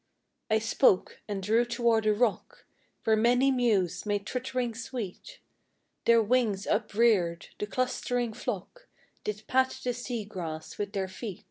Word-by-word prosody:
I 220 - +4
spoke, 220 -2 +2
and 200 -2 -3
drew 220 +4 +3
toward 235 -2 +1
a 215 - +5
rock, 225 -1 -1 0.4
Where 220 - +4
many 245 +5 +4
mews 205 -9 +1
made 205 -1 -1
twittering 250 0 -2
sweet; 240 - -6 0.7
Their 230 -1 +6
wings 215 -4 +1
upreared, 210 -5 +2
the 210 - -2
clustering 245 -1 -1
flock 245 - -5 0.4
Did 210 0 -4
pat 260 0 +1
the 245 - 0
sea 240 -2 -4
grass 165 -6 -6
with 205 0 -3
their 195 -1 -1
feet. 190 +1 -7
220 Hz, 140 wpm, -29 LUFS, 205-245 Hz, 0.7 s, Their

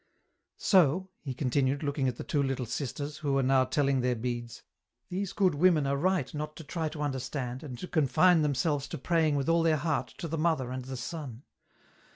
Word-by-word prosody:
" - - -52
So," 185 0 +3
he 135 -4 -5
continued, 135 +2 0
looking 140 -2 0
at 125 - -1
the - - -6
two 145 - 0
Little 135 -2 -1
Sisters, 145 +4 -4
who 145 -3 -1
were 135 0 +2
now 130 0 +4
telling 135 0 +1
their 125 0 +1
beads, 120 0 -4 0.2
" - - -54
these 190 +1 -2
good 195 -4 +2
women 155 -1 +4
are 140 0 +1
right 180 -1 0
not 150 0 -4
to 160 - -9
try 160 +1 -3
to 150 -1 -5
understand, 130 -2 -3
and 130 -5 -7
to 180 - -6
confine 160 +3 +4
themselves 145 0 0
to - - -5
praying 160 0 +1
with 140 -1 -1
all 165 0 +4
their 160 -1 +3
heart 155 +1 -1
to 170 - -4
the 165 0 -3
Mother 155 -6 +1
and 130 -1 -5
the 130 0 -5
Son. 140 -4 -6
145 Hz, 210 wpm, -29 LUFS, 130-160 Hz, 0.2 s, now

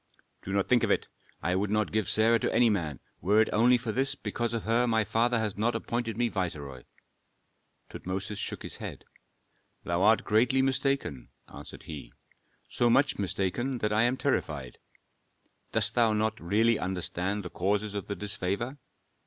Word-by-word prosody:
'" - - -45
"Do 95 - -4
not 100 -1 +1
think 125 -2 +4
of - - +1
it. - - +1 0.3
I 90 +4 +1
would 100 +2 0
not 105 0 0
give 110 -3 0
Sarah 115 +1 +3
to - - -1
any 120 -2 +4
man, 80 -9 -2 0.2
were 105 +4 +3
it 110 - +3
only 120 +3 +5
for 115 -2 -4
this, 135 +4 +1
because 120 -2 -3
of 115 -2 -2
her 115 +2 +2
my 110 -1 +2
father 120 +3 +2
has 110 -3 -1
not 115 +3 0
appointed 115 -1 -2
me 120 0 +2
viceroy." 75 - -4 1.0
Tutmosis 100 +3 -5
shook - - -4
his - - -7
head. - - -7 0.8
"Thou 85 +1 -1
art 110 +3 +5
greatly 125 +5 +3
mistaken," 135 - -1 0.2
answered - - -10
he, 75 -4 -8 0.6
"so 120 - +1
much 135 +1 +3
mistaken 100 +7 -1
that 105 -2 -1
I 110 - +3
am 120 +2 +2
terrified. 75 - -2 0.9
Dost - - +2
thou 115 -2 +3
not 110 +1 0
really 110 +6 +2
understand 95 +2 -2
the 90 - -7
causes 100 +4 -1
of 100 -2 -4
the 100 - -3
disfavor? 105 +6 -3
110 Hz, 175 wpm, -29 LUFS, 95-120 Hz, 1.0 s, only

